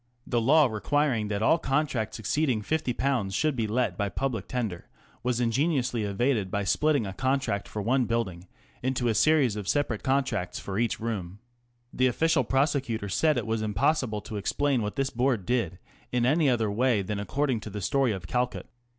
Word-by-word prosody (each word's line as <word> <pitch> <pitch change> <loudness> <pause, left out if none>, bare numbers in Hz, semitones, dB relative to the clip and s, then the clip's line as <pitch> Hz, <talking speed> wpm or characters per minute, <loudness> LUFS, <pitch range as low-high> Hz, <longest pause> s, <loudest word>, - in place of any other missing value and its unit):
The 120 -2 0
law 150 +6 +5
requiring 120 +1 0
that 105 0 -2
all 165 +9 +4
contracts 135 -7 -1
exceeding 120 0 0
^50 130 -6 0
should 155 +8 +1
be 115 -3 -1
let 120 +2 -1
by 100 -1 0
public 125 -3 -3
tender 110 -9 -3 0.3
was 125 -1 0
ingeniously 125 0 +1
evaded 105 0 0
by 100 +1 -1
splitting 140 +5 +2
a 95 - -5
contract 130 -4 -1
for 105 - -5
one 125 +3 +2
building 100 -6 -2 0.3
into 125 -1 0
a - - +2
series 140 -3 +3
of 105 -3 -5
separate 135 -5 0
contracts 135 -9 0
for 100 +1 -4
each 115 -1 0
room. 100 -5 -4 0.6
The 130 - +3
official 160 +5 +2
of 130 - +1
Reviews. 135 - 0
prosecutor 135 -7 0
said 155 +9 +2
it - - -1
was 110 -1 -1
impossible 110 +1 0
to 105 - -6
explain 135 +5 0
what 105 -1 -3
this 135 0 -1
Board 120 -5 0
did 105 -6 0 0.3
in 125 -1 +1
any 150 +3 +3
other 115 -4 +1
way 115 -1 +2
than 100 +1 -3
according 130 +3 -1
to 110 - -8
the 105 +1 -5
story 135 +5 +1
of 95 -4 -5
Calcutt. 125 +6 -1
120 Hz, 185 wpm, -27 LUFS, 105-135 Hz, 0.6 s, law